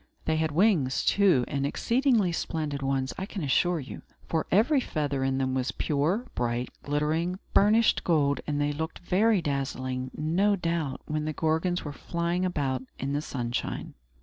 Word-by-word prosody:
They 160 0 +1
had 160 -1 0
wings, 160 -6 +2
too, 185 -11 +4
and 140 -1 -2
exceedingly 230 - +2
splendid 155 -4 -3
ones, 135 -1 -1
I 190 - -3
can 195 -5 -5
assure 170 +5 +2
you; 135 - -8 0.3
for 160 -1 -1
every 250 - +4
feather 145 - -2
in 135 0 0
them 130 -1 0
was 130 -1 0
pure, 160 - 0
bright, 120 0 -1
glittering, 155 +5 0 0.2
burnished 220 +3 +4
gold, 145 -4 +2
and 145 -1 -1
they 145 0 +1
looked 160 +3 -4
very 200 +2 +2
dazzlingly, 130 -3 -2
no 185 +7 +2
doubt, 165 -6 -2
when 155 0 -2
the 155 - -2
Gorgons 160 +4 0
were 145 - -4
flying 170 +4 -2
about 140 -7 -1 0.2
in 135 +1 -3
the 145 - 0
sunshine. 120 -5 -4
155 Hz, 165 wpm, -28 LUFS, 140-180 Hz, 0.3 s, too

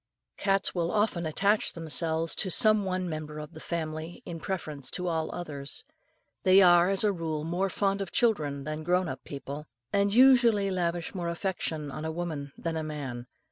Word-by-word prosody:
Cats 195 -1 +1
will 170 -2 0
often 205 -6 +1
attach 200 +7 +2
themselves 165 0 -1
to 190 - +1
some 215 +2 +4
one 185 -1 -1
member 155 -2 -5
of 150 +2 -8
a - - -8
family 160 0 -5
in 165 -1 -6
preference 155 -7 -3
to 180 - -2
all 160 -2 -1
others. 145 -5 -6 0.6
They 190 +1 +6
are 175 0 +6
as 195 +1 +1
a 210 - +4
rule 160 -4 -3
more 175 +4 0
fond 195 0 0
of 195 - -4
children 150 - +1
than 155 +2 -4
grown 180 +2 +2
up - - -6
people, 140 +1 -7 0.3
and 200 0 +3
usually 235 -4 +5
lavish 175 -2 -1
more 175 -3 -3
affection 170 -4 -2
on 155 - -6
a 160 - -2
woman 160 -4 -4
than 165 -1 -3
a 160 - -2
man. 135 -6 -5
170 Hz, 180 wpm, -29 LUFS, 155-190 Hz, 0.6 s, They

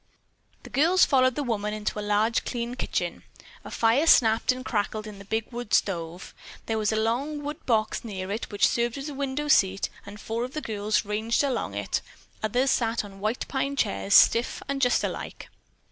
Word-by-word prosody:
The - - -12
girls 340 +6 +4
followed 255 -2 +3
the 295 - -1
woman 210 -4 -2
into 210 0 -3
a - - -2
large, 210 +2 +1
clean 240 -1 -3
kitchen. 250 - -3 0.4
A - - -9
fire 235 +8 +2
snapped 225 -6 +5
and 255 0 -5
crackled 215 -1 -2
in 210 -2 -9
the 195 - -11
big 220 +3 -2
wood 240 -2 -1
stove. 175 -2 -2 0.3
There 225 -1 -1
was 215 0 +1
a - - 0
long 260 +7 -1
wood 295 +1 -6
box 220 -1 +1
near 195 -4 -5
it 220 +3 -4
which 205 - +3
served 240 +2 -1
as 275 +2 -5
a - - -6
window 280 +1 -3
seat, 195 -8 +3
and 205 +1 -10
four 225 +2 -3
of 255 +3 -6
the - - -1
girls 210 -2 -1
ranged 220 +5 0
along 260 -5 -1
on - - -1
it, - - -1 0.4
the - - -1
others 255 +5 +1
sat 230 -2 0
on 195 -1 -12
white 215 +4 -2
pine 275 +1 -2
chairs, 100 - +1
stiff 235 +2 +5
and 275 0 -2
just 245 -1 +3
alike. - - -5
225 Hz, 205 wpm, -26 LUFS, 210-260 Hz, 0.4 s, snapped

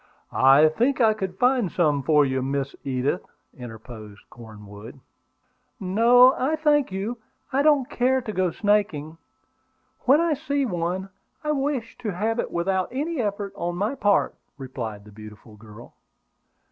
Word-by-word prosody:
"I 135 +4 +6
think 240 - 0
I 220 -3 +4
could 190 -3 -5
find 245 -6 +2
some 150 -5 +1
for 150 +2 +3
you, 130 -1 -1
Miss 135 +1 -3
Edith," 135 +5 -2 0.3
interposed 110 -3 -11
Cornwood. 105 +1 -12 0.8
"No, 235 +7 +5
I 280 +5 -1
thank 295 -5 +1
you. 205 +5 -4 0.3
I 275 - +2
don't 290 -4 +3
care 260 -1 +1
to 235 -4 -6
go 185 -1 +1
snaking. 165 -6 -1 0.9
When 275 +4 +5
I 335 -1 +1
see 285 -1 -2
one 180 -1 -3 0.3
I 300 - -1
wish 270 -5 -3
to 235 -4 -4
have 225 +5 -1
it - - -2
without 185 +2 -1
any 295 +3 -2
effort 205 -2 -3
on 175 0 -3
my 205 +8 -1
part," 205 -7 +1 0.2
replied 115 -7 -7
the 105 - -14
beautiful 105 +1 -13
girl. 105 +2 -14
190 Hz, 145 wpm, -24 LUFS, -, 0.9 s, I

